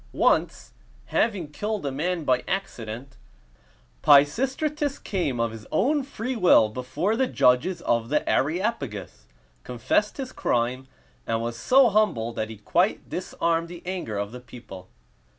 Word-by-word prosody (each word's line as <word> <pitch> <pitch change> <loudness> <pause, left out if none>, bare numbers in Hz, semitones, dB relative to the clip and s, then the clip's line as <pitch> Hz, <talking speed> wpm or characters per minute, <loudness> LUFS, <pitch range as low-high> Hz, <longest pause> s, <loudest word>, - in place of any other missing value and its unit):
Once, - - +1 0.4
having 200 -8 +1
killed 210 +3 -3
a 140 - -1
man 165 +5 -2
by 130 -3 +1
accident, 130 - -5 0.8
Pisistratus 270 - +3
came 160 - -2
of 115 -1 0
his 110 -1 -10
own 285 - +2
free 260 -2 -5
will 175 - +5
before 130 - -2
the 260 +2 +1
judges 165 - +2
of 115 -1 0
the 150 - 0
Areopagus, 140 - -2 0.4
confessed 125 - 0
his 265 -2 -5
crime, 125 +2 -1 0.4
and 115 0 0
was 115 0 -3
so 250 - +5
humble 190 - +1
that 110 -1 -3
he 110 - -8
quite 105 - 0
disarmed 165 0 -1
the 175 0 -10
anger 180 - -4
of 100 +1 -3
the 125 - -8
people. 120 -6 -12
145 Hz, 140 wpm, -25 LUFS, -, 0.8 s, will